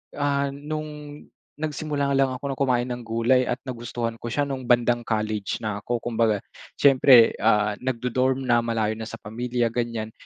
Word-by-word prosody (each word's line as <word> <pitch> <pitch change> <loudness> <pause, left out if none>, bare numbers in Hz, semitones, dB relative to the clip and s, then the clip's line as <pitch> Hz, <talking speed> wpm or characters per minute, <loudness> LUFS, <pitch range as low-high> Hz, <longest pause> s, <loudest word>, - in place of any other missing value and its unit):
Ah, 140 -1 0
nung 150 0 -7 0.4
nagsimula 150 -2 -2
lang 135 -1 +3
ako 135 +2 -4
ng - - -11
kumain 125 -3 +2
ng 125 -1 -5
gulay 115 +3 +2
at 125 -1 -1
nagustuhan 120 -2 -4
ko 120 - -4
siya 145 +5 0
nung 130 -3 -5
bandang 120 0 +3
college 110 -3 -2
na 105 -2 -4
ako. 120 +3 -1
Kumbaga 115 -3 +1 0.4
siyempre, 130 -4 +7
ah, 105 -1 +3
nag-du-dorm 130 +1 0
na 120 -2 +4
malayo 115 -2 0
na 110 - -5
sa 115 - -7
pamilya, 120 +2 -2
ganiyan. 115 -2 -3
120 Hz, 165 wpm, -24 LUFS, 115-135 Hz, 0.4 s, siyempre